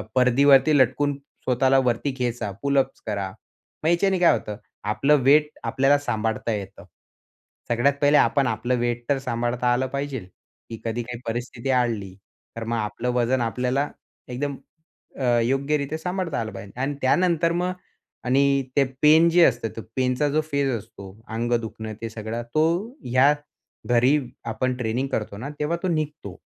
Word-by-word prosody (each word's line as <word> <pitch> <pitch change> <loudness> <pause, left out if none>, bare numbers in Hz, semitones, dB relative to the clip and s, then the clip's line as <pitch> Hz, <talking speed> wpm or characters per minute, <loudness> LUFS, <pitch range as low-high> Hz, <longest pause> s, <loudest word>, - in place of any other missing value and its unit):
परदीवरती 135 +3 +5
लटकून 140 +2 +2 0.3
स्वतःला 130 +1 +3
वरती 125 +3 0
खेचा, 120 -4 -2
पूल 140 0 +1
अप्स 135 0 -2
करा. 100 -2 -2 0.5
मग 155 - +1
ह्याच्याने 185 +2 +2
काय 175 - +6
होतं 105 -1 -7 0.3
आपलं 140 +8 +3
वेट 150 +2 +5
आपल्याला 135 +2 +3
सांभाळता 110 -4 -2
येतं. 100 -2 -7 0.8
सगळ्यात 120 +4 +3
पहिले 145 +1 +5
आपण 140 -3 +3
आपलं 115 +3 0
वेट 120 0 -1
तर 140 - +3
सांभाळता 120 -1 0
आलं 130 +1 0
पाहिजेल. 140 -6 -4 0.4
की 115 - -7
कधी 115 +1 -2
काही 120 0 -7
परिस्थिती 120 +2 -4
आली, 115 -7 0 0.4
तर 115 - -5
मग 115 +1 -2
आपलं 115 +3 -3
वजन 125 +1 +1
आपल्याला 125 +4 0 0.4
एकदम 135 +2 -3 0.6
अ, - - -2 0.2
योग्यरीत्या 140 +4 0
सांभाळता 180 -1 -3
आलं 110 -1 -4
पाहिजे. 100 0 -9
आणि 140 +1 -1
त्यानंतर 170 +4 +2
मग 180 +2 0 0.5
आणि 140 +2 +3
ते 140 - +5 0.2
पेन 155 +2 +6
जे 175 +1 +5
असतं 120 -3 +1
ते 115 - -3
पेनचा 130 +3 +1
जो 155 +2 +1
फेज 140 -1 +1
असतो 100 -1 -11 0.3
अंग 120 +1 -1
दुखणं 110 0 -6
ते 115 - -4
सगळं 110 +1 -5
तो 155 - +4 0.4
ह्या 130 +4 +4 0.5
घरी 125 +4 +4 0.3
आपण 130 +3 -1
ट्रेनिंग 125 +3 -1
करतो 105 -2 -3
ना 135 +6 -6
तेव्हा 150 +3 0
तो - - +1
निघतो. 150 - -3
130 Hz, 155 wpm, -24 LUFS, 115-145 Hz, 0.8 s, काय